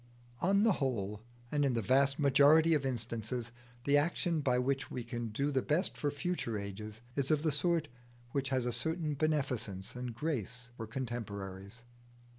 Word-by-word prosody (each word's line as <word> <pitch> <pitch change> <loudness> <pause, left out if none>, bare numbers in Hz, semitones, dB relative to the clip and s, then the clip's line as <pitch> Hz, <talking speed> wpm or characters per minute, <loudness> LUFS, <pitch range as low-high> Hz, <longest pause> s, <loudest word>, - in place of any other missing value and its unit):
On 200 +3 +3
the 225 - +5
whole, 105 -6 -1 0.3
and 145 -1 +2
in 135 -3 +2
the 115 - +1
vast 135 +5 +4
majority 145 +3 +6
of 140 -3 +2
instances, 115 -1 -2 0.3
the 140 +2 +4
action 170 +1 0
by 125 -3 +2
which 135 +2 0
we 125 - -4
can 120 -1 -4
do 140 +7 -1
the 135 -2 +2
best 165 +8 0
for 145 - -1
future 145 -6 -2
ages 105 +2 -6
is 140 -1 0
of 155 -1 +2
the 160 - +2
sort 160 +2 +1 0.4
which 135 0 -1
has 130 -2 +1
a 125 - 0
certain 160 +4 -1
beneficence 135 -11 -1
and 125 -2 -5
grace 125 - -3
for 115 -2 -6
contemporaries. 105 -3 -5
130 Hz, 170 wpm, -33 LUFS, 115-150 Hz, 0.4 s, majority